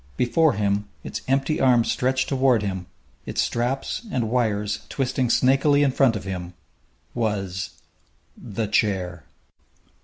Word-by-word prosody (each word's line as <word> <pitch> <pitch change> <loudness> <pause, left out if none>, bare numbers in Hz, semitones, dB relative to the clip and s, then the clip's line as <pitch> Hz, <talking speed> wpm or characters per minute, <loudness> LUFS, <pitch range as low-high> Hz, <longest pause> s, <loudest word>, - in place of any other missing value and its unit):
Before 155 +5 +3
him, 100 0 0 0.2
its - - -5
empty 135 +3 +1
arms 125 -3 +4
stretched 130 +1 0
toward 130 -5 +2
him, 95 -3 -4 0.4
its - - -3
straps 120 +3 -1
and 115 - -1
wires 105 -4 0
twisting 130 -2 -1
snakily 135 +4 +4
in 140 - +3
front 130 -3 +3
of 100 - -4
him, 90 -2 -6 0.6
was 95 -6 -2 0.6
The 110 0 -4
Chair! 95 -6 0
115 Hz, 125 wpm, -24 LUFS, 100-130 Hz, 0.6 s, arms